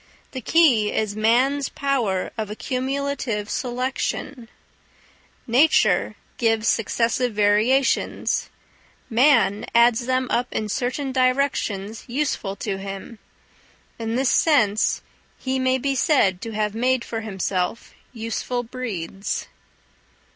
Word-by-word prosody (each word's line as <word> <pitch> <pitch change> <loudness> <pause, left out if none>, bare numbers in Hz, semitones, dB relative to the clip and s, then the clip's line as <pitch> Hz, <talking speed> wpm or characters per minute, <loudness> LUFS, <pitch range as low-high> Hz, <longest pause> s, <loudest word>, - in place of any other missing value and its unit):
The 260 - -6
key 245 -7 +4
is 215 -2 -1
man's 255 +6 +2
power 240 -10 -1
of 220 -3 -4
accumulative 255 -2 -3
selection: 250 -1 -3 1.0
nature 270 +7 +3 0.2
gives 225 -1 +1
successive 230 +2 +1
variations; 215 +6 +2 0.6
man 230 -4 +3
adds 240 +1 +4
them 255 0 +1
up 245 +1 +1
in 215 -1 -3
certain 260 +5 -2
directions 255 -6 0
useful 245 -6 -2
to 195 -1 -4
him. 195 +3 -8 0.8
In 225 0 -2
this 260 0 +2
sense 220 -10 +2 0.3
he 265 0 -2
may 260 0 +2
be 275 +2 -1
said 245 - +2
to 230 - -5
have 210 -1 -1
made 250 +2 +1
for 225 -1 -4
himself 190 -1 -3 0.2
useful 235 +1 -3
breeds. 205 -6 -5
235 Hz, 105 wpm, -23 LUFS, 215-260 Hz, 1.0 s, key